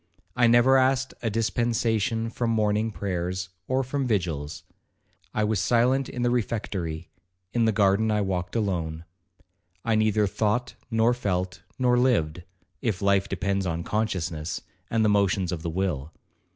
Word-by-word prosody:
I 120 -1 +4
never 120 +3 +6
asked 130 0 +2
a 115 - 0
dispensation 115 0 0
from 120 0 -1
morning 110 0 +1
prayers, 90 -3 -3 0.2
or 130 +1 +1
from 130 +1 -2
vigils. 85 -8 -2 0.7
I 110 - 0
was 105 -1 +1
silent 125 +7 +2
in 125 - -3
the 120 - +2
refectory,—in 90 -2 -3
the 110 - +4
garden 100 +1 +3
I 105 -1 +2
walked 90 -1 -2
alone. 85 -7 -2 0.8
I 115 - +2
neither 110 -1 +3
thought, 105 +4 0 0.2
nor 115 +1 +3
felt, 90 -6 -2 0.2
nor 125 -1 +3
lived,—if 90 -2 -1
life 100 0 +2
depends 100 0 -1
on 85 0 -2
consciousness, 90 -7 -2 0.3
and 115 -1 +2
the - - +4
motions 100 -2 +2
of 85 -3 -3
the 85 - -3
will. 80 -5 -2
105 Hz, 140 wpm, -26 LUFS, 90-115 Hz, 0.8 s, never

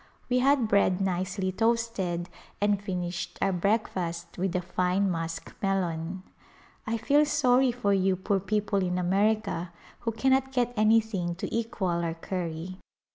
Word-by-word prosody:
We 250 - +4
had 270 -2 +3
bread 200 -3 +3
nicely 185 0 -1
toasted 225 -5 0 0.3
and 205 -1 +2
finished 180 -3 -4
our 195 - +1
breakfast 180 -3 -1
with 185 0 -2
a 180 - +1
fine 185 +2 +1
musk 165 -1 -4
melon. 185 -2 -1 0.6
I 225 +1 0
feel 285 +6 +4
sorry 255 -3 +3
for 235 -4 0
you 190 -1 +2
poor 195 +2 0
people 205 +1 0
in 180 0 -1
America 195 -1 +1 0.3
who 230 - -2
cannot 265 +3 +1
get 245 -1 +1
anything 215 -5 +2
to 190 - -4
equal 190 -7 -1
our 165 -1 -2
curry. 175 +1 -5
195 Hz, 140 wpm, -28 LUFS, 180-225 Hz, 0.6 s, We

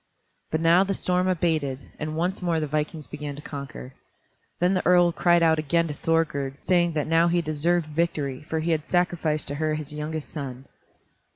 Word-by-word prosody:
But 160 - -1
now 170 +3 +5
the 195 0 -2
storm 180 0 0
abated, 160 -7 0 0.2
and 155 0 -3
once 180 +4 -1
more 170 -2 +1
the 155 - -1
vikings 150 +1 -3
began 145 -1 -6
to 145 - -9
conquer. 140 -2 -7 0.7
Then 180 +2 +3
the 185 - 0
earl 175 -1 +5
cried 175 0 +3
again 160 +1 +2
to - - -3
Thorgerd, 145 -4 0
saying 175 +1 +2
that 150 -2 -1
now 165 +1 +3
he 175 0 +2
deserved 165 +2 +1
victory, 150 -4 -2
for 160 0 -1
he 170 +2 0
had 155 -2 -1
sacrificed 170 -4 +1
to - - -3
her 155 -1 +1
his 150 -1 -6
youngest 150 0 -4
son. 135 -3 -6
160 Hz, 185 wpm, -25 LUFS, 150-175 Hz, 0.7 s, now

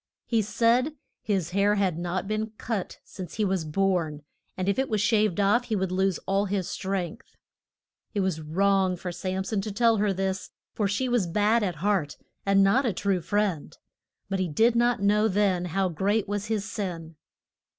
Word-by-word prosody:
He 230 -2 +2
said 235 +7 +2 0.3
his 190 -5 -1
hair 200 +2 +3
had 190 -5 0
not 175 +2 -2
been 215 +1 -2
cut 220 -6 -3
since 185 -2 -9
he 215 - +1
was 190 -3 0
born, 160 -3 0 0.3
and 185 0 -2
if 200 +5 +1
it 265 - 0
were 215 - +1
shaved 210 -2 +2
off 205 +5 +3
he 220 - -1
would 190 -2 -1
lose 190 0 +1
all 195 +1 +1
his 195 -2 -2
strength. 190 -4 -4 0.8
It 200 - +2
was 185 -4 -1
wrong 190 +3 +2
for 180 +1 -5
Sam 185 +2 -3
son 200 0 -1
to 210 - -4
tell 230 +2 +3
her 205 0 +2
this, 190 0 -2 0.2
for 210 - 0
she 205 +6 -1
was 240 -7 +1
bad 210 +6 +2
at 185 -5 -1
heart 185 -9 +1 0.3
and 195 0 +5
not 225 +8 +4
a 235 -6 0
true 190 0 0
friend. 195 -3 -1 0.5
But 195 -1 -2
he 185 - 0
did 225 +10 +3
not 240 -3 +2
know 210 +2 +4
then 195 -3 +1
how 185 +2 0
great 200 +6 0
was 205 +1 -3
his 210 -2 -1
sin. 170 -7 -5
195 Hz, 190 wpm, -26 LUFS, 185-215 Hz, 0.8 s, and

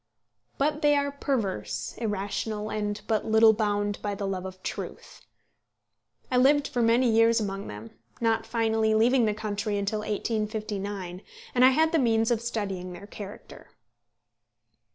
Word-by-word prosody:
But 300 +2 0
they 295 0 +4
are 285 0 +1
perverse, 260 -9 -2
irrational, 210 0 -3
and 210 -1 -2
but 220 -2 0
little 220 0 +6
bound 205 -1 -1
by 205 -1 -2
the 200 - -4
love 190 -1 -3
of 185 0 -11
truth. - - -7 1.1
I 250 - +3
lived 280 +3 +4
for 245 - -1
many 235 +2 +4
years 230 +1 +4
among 195 -2 -4
them 105 +2 -9 0.3
not 225 -1 +1
finally 220 -1 +1
leaving 235 +2 +4
the 210 -1 0
country 210 -1 -2
until 200 +2 -1
1859, 210 -3 -3 0.3
and 250 - +4
I 260 - +9
had 315 +4 +3
the 330 - +3
means 225 -2 +2
of 230 -2 +1
studying 195 -6 -3
their 200 - -10
character. 205 -1 -10
220 Hz, 150 wpm, -27 LUFS, 205-235 Hz, 1.1 s, I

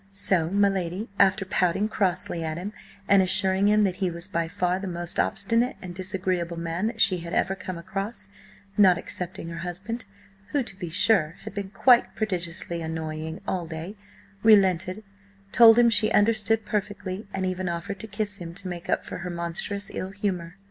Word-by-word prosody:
So 190 -4 +1
my 200 +2 +3
lady, 190 +2 -2
after 195 0 +4
pouting 185 +2 +1
crossly 185 -5 -1
at 160 0 -3
him 195 +4 -5 0.3
and 200 -1 +6
assuring 190 +1 +4
him 210 0 +4
that 185 -3 0
he 190 -2 0
was 170 +1 -5
by 170 -4 -1
far 180 +2 -1
the 195 - -5
most 175 -1 -3
obstinate 230 +6 +1
and 180 -1 -8
disagreeable 185 -2 -1
man 170 +4 -2
that 225 -1 -5
she 185 -4 +4
had 170 +1 -7
ever 195 - +1
come 185 -2 -6
across, 195 - -5 0.5
not 190 -4 +6
excepting 175 -1 -5
her 170 0 -6
husband, 195 +7 -4 0.5
who, 285 -2 +2
to 215 - -9
be 180 -3 -6
sure, 165 -2 +2
had - - -8
been 200 -1 -4
quite 240 +5 +4
prodigiously 170 -4 -2
annoying 160 0 -5
all 175 -3 -2
day, 165 +5 -6 0.5
relented, 190 -2 +4 0.5
told 225 -1 +8
him 240 -1 +6
she 215 -1 +4
understood 220 +1 +3
perfectly, 205 -1 -3
and 190 -1 -2
even 185 0 -2
offered 170 +3 -4
to 220 - -7
kiss 205 0 -2
him 170 -1 -8
to 195 0 -5
make 175 -1 -7
up - - 0
for - - -6
her 180 +1 -5
monstrous 175 +4 -2
ill 185 - -4
humour. 190 -3 -3
190 Hz, 185 wpm, -26 LUFS, 170-205 Hz, 0.5 s, told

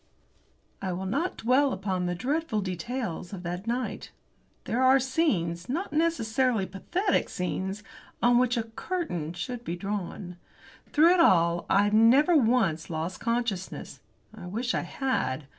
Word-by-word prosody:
I 190 -2 -2
will 185 +2 -4
not 325 - -1
dwell 260 +4 +3
upon 185 -3 -2
the 175 - -1
dreadful 270 - -1
details 185 0 -4
of 185 -2 -7
that 180 +4 -5
night. 245 +2 -3 0.5
There 245 - -1
are 260 +1 +6
scenes, 215 - 0
not 335 +8 -3
necessarily 255 - +1
pathetic 345 - -1
scenes, 190 +3 -3 0.4
on 240 0 +4
which 250 -1 +2
a 230 - 0
curtain 225 - -4
should 240 +7 -5
be 170 - -3
drawn. 180 -1 -5 0.5
Through 330 +3 +6
it 365 - +2
all 170 - +4
I 200 +1 +4
never 250 +10 +5
once 225 - +2
lost 165 +2 -4
consciousness. 230 -5 -3 0.3
I 195 -5 -9
wish 235 +7 -2
I - - 0
had. 155 - -2
220 Hz, 140 wpm, -27 LUFS, 180-260 Hz, 0.5 s, are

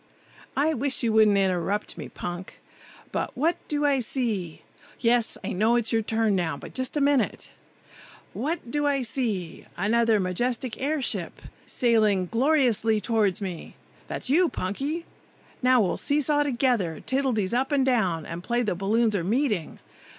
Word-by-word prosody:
"I 305 +3 +2
wish 270 0 0
you 225 -2 +1
wouldn't 215 -2 +5
interrupt 195 +1 0
me, - - -8
Punk! 175 +1 -7 0.5
But - - -3
what 320 +6 +1
do 295 -1 0
I 280 -2 +3
see? 220 - -3 0.4
Yes, 235 -1 +2
I - - -3
know 220 +5 +2
it's 235 -1 0
your 225 - +3
turn 220 -1 +1
now, 165 -5 -1
but - - -11
just 260 +2 -1
wait - - 0
a - - +1
minute! 285 -2 +1 0.8
What 290 -3 -3
do 295 0 +1
I 275 -2 +1
see? 215 -8 -3
Another 225 +3 +2
majestic 235 +7 -2
air 290 +1 0
ship, - - -2 0.3
sailing 215 -6 +2
gloriously 235 -4 +2
toward 210 -4 +1
me! 180 -4 -6 0.3
That's - - -5
you, 330 +6 +4
Punky! 280 - -3 0.6
Now 255 0 +4
we'll 190 - 0
see 290 0 +1
saw 295 0 +2
together, 240 - 0
tiddledies 250 -7 0
up 260 +4 0
and 275 -2 +2
down, 190 -11 +1
and 170 +1 -6
play 240 +3 0
the 210 - 0
balloons 210 +4 +1
are 180 - 0
meeting. 210 - -1
235 Hz, 160 wpm, -26 LUFS, 200-270 Hz, 0.8 s, wouldn't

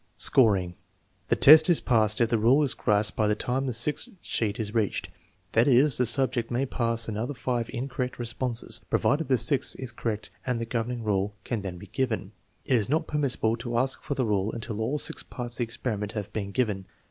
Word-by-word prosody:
Scoring. 100 -8 +3 0.5
The - - +2
test 155 +3 +8
is 175 - +6
passed 110 -3 +2
if 115 -2 +3
the 115 -1 +1
rule 130 +7 +4
is 135 - +1
grasped 105 0 +1
by 110 - +1
the 105 - +2
time 130 +5 -2
the - - -1
sixth 135 +6 -1
sheet 110 -6 -2
is 105 -1 -3
reached; 110 -4 -1 0.4
that 115 +3 +3
is, 135 +1 +5
the 125 - +3
subject 125 0 +1
may 125 +3 0
pass 115 -3 -1
after 110 +6 -3
five 120 -3 -2
incorrect 125 0 -4
responses, 120 0 -2
provided 150 +2 +1
the 130 -1 +3
sixth 140 +1 +1
is 130 -2 -5
correct 110 -2 -4
and 125 -2 -1
the 115 - -3
governing 115 0 -3
rule 100 -1 -1
can 115 -4 -3
then 95 -3 -6
be 90 - -10
given. 110 -2 -2 0.3
It 130 - +3
is 105 -1 -1
not 160 +3 +1
permissible 135 -7 0
to 120 0 -3
ask 130 +2 0
for 140 - -4
the 130 -1 0
rule 105 -1 0
until 115 -1 -5
all 135 +7 -1
six - - -2
parts 120 -1 -7
of - - -3
the 120 - +1
experiment 110 -2 -4
have 105 -2 -5
been 100 -2 -3
given. 100 -4 -1
115 Hz, 210 wpm, -27 LUFS, 110-130 Hz, 0.5 s, test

